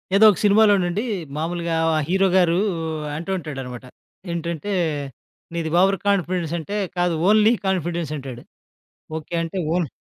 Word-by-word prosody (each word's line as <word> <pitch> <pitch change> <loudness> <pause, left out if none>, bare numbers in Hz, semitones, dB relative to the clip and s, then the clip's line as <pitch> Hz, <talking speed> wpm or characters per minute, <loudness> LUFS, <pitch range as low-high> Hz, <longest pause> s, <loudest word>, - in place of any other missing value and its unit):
ఏదో 220 +2 +7
ఒక 190 - -4
సినిమాలోనండి 205 -2 +4 0.3
మామూలుగా 170 +1 -2 0.2
ఆ - - +2
హీరోగారు 185 -2 +3 0.6
అంటూ 170 +5 -4
ఉంటాడనమాట. 135 -7 -7 0.5
ఏంటంటే. 170 +3 -3 0.8
"నీది 165 -1 -2
ఓవర్ 195 +1 +3
కాన్ఫిడెన్స్" 180 -4 0
అంటే 200 +6 -4 0.2
"కాదు. 175 -1 +2 0.2
ఓన్లీ 215 +2 +5
కాన్ఫిడెన్స్" 175 -4 -1
అంటాడు. 130 -3 -8 0.7
ఓకే. 160 +2 -9
అంటే 165 +3 -5 0.2
ఓన్ 175 -3 0
175 Hz, 120 wpm, -22 LUFS, 160-195 Hz, 0.8 s, ఏదో